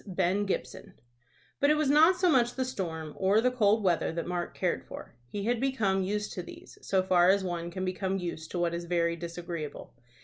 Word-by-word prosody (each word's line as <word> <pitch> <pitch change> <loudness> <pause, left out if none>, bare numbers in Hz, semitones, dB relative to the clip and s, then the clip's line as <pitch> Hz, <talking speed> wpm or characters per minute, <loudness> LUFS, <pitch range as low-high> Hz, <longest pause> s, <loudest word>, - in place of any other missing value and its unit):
BEN 190 +2 0
GIBSON. 130 -9 -4 0.6
But 285 - +3
it 300 - +5
was 305 -2 +1
not 320 +5 +6
so 365 0 +2
much 245 -6 +3
the 260 - -1
storm 160 -10 -5
or 195 +3 +3
the 250 +2 +2
cold 220 -3 +2
weather 175 -3 +1
that 165 0 -4
Mark 175 -1 -3
cared - - -1
for. - - -10
He 200 +11 -5
had 235 +2 0
become 215 -8 +1
used 210 +2 -2
to 180 - -4
these, - - -12
so 190 -1 +1
far 180 -1 +4
as 195 0 +3
one 175 -2 -3
can 185 +2 -4
become 190 +1 -2
used 170 -3 -5
to - - -4
what 175 -1 0
is 170 0 -4
very 170 -1 +1
disagreeable. 170 -2 -6
190 Hz, 210 wpm, -29 LUFS, 170-215 Hz, 0.6 s, not